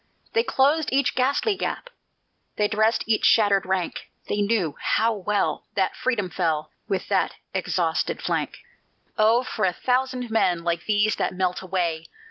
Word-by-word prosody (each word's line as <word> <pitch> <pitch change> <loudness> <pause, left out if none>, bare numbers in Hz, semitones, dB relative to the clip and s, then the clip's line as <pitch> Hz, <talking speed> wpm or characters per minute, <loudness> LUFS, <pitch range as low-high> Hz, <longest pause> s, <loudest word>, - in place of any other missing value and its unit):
They 460 - +4
closed 295 - +2
each 275 0 +2
ghastly 280 - +1
gap; - - -4 0.6
They 210 - +2
dressed 220 +2 +1
each 220 -1 +1
shattered 200 -4 +4
rank; 185 -2 -2 0.2
They 205 - -1
knew 200 -8 0
how 225 +1 +1
well 205 0 -1
That - - 0
freedom 235 -7 -1
fell 160 -4 -1 0.2
With 195 -3 -2
that - - +1 0.2
exhausted - - -1
flank. - - -2 0.6
"Oh, 225 +3 +4
for 220 -3 -4
a 185 -1 +2
thousand 255 +1 -1
men 180 -6 +2
Like 170 0 -1
these 210 0 +2
that - - -1
melt 180 -1 -1
away!" 175 -4 -2
215 Hz, 150 wpm, -24 LUFS, 185-250 Hz, 0.6 s, They